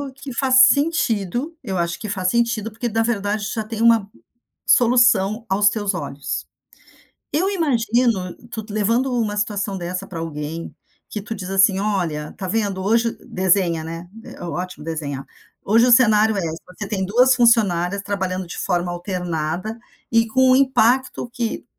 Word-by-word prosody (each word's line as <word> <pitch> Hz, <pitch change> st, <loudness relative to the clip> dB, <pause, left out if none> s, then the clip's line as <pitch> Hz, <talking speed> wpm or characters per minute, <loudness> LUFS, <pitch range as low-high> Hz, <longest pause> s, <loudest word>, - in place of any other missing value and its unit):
que 275 Hz, -1 st, -9 dB
faz 260 Hz, +1 st, +1 dB
sentido. 280 Hz, -, 0 dB
Eu 195 Hz, -6 st, -3 dB
acho 170 Hz, 0 st, -2 dB
que 220 Hz, -, -6 dB
faz 190 Hz, -2 st, -2 dB
sentido 230 Hz, -1 st, 0 dB
porque, 235 Hz, +3 st, -4 dB
na 225 Hz, +1 st, 0 dB
verdade, 210 Hz, -2 st, -1 dB
tu -, -, -4 dB
já 220 Hz, -, -2 dB
tem 225 Hz, +1 st, -6 dB
uma 230 Hz, -3 st, +4 dB, 0.6 s
solução 235 Hz, -3 st, +4 dB
aos 205 Hz, +1 st, +4 dB
teus 205 Hz, -2 st, -2 dB
olhos. 140 Hz, -4 st, -5 dB, 0.9 s
Eu 365 Hz, +7 st, +1 dB
imagino 235 Hz, -, 0 dB
tu 220 Hz, -2 st, -5 dB
levando 230 Hz, +5 st, +1 dB
uma 220 Hz, -4 st, -1 dB
situação 205 Hz, -1 st, -2 dB
dessa 180 Hz, +2 st, -4 dB
pra 170 Hz, -4 st, -7 dB
alguém, 160 Hz, 0 st, -6 dB, 0.3 s
que 210 Hz, -, -4 dB
tu 210 Hz, -, -6 dB
diz 185 Hz, -2 st, -7 dB
assim: 195 Hz, 0 st, +4 dB
"Olha, 175 Hz, -8 st, -2 dB
tá 190 Hz, -, -5 dB
vendo? 195 Hz, -1 st, -1 dB
Hoje" 230 Hz, +3 st, +1 dB
desenha, 180 Hz, -3 st, +1 dB
né, 165 Hz, +2 st, -7 dB, 0.2 s
é -, -, -11 dB
ótimo 175 Hz, -2 st, -5 dB
desenhar. 145 Hz, -4 st, -4 dB, 0.4 s
"Hoje 230 Hz, +4 st, +4 dB
o -, -, +4 dB
cenário 220 Hz, -3 st, +5 dB
é: -, -, 0 dB, 0.3 s
você 195 Hz, +3 st, -7 dB
tem 195 Hz, -2 st, -2 dB
duas 250 Hz, +6 st, +4 dB
funcionárias 200 Hz, -6 st, +3 dB
trabalhando 190 Hz, -2 st, -3 dB
de 170 Hz, -, -8 dB
forma 175 Hz, -1 st, -1 dB
alternada 175 Hz, +3 st, -3 dB, 0.3 s
e, 230 Hz, 0 st, +3 dB
com 260 Hz, +3 st, +3 dB
o 255 Hz, -, +6 dB
impacto 260 Hz, -2 st, +2 dB
que 235 Hz, -1 st, -3 dB
205 Hz, 160 wpm, -21 LUFS, 180-235 Hz, 0.9 s, o